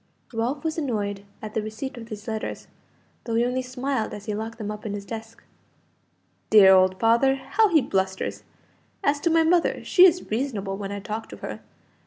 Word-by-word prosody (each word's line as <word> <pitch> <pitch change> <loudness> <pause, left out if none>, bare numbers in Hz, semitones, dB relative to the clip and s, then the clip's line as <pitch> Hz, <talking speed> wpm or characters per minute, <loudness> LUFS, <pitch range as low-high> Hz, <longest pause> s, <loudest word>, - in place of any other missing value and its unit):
Ralph 245 +6 -2
was 320 0 -1
annoyed 205 -8 -2 0.2
at 215 -1 -6
the 220 - 0
receipt 220 +6 -6
of 230 -2 -9
these 215 0 -8
letters, 220 -1 -4 0.6
though 230 - -2
he 235 +1 +3
only 250 +1 0
smiled 255 -1 -3
as 205 -1 -10
he 215 - -2
locked 220 +2 -5
them 210 -2 -4
up 210 0 -7
in 210 - -4
his 200 -1 -7
desk. 225 +1 -8 1.1
"Dear 200 -3 +8
old 185 0 +4
father! 235 +4 +4
how 275 +12 +2
he 320 -5 +5
blusters! 190 0 -2 0.6
As 285 0 +2
to 335 - +1
my 325 0 +4
mother, 340 +1 +2
she 370 0 +7
is 355 -7 -1
reasonable 215 -5 -2
when 200 0 -5
I 200 0 -5
talk 220 +2 -5
to - - -9
her. - - -6
225 Hz, 195 wpm, -25 LUFS, 210-270 Hz, 1.1 s, Dear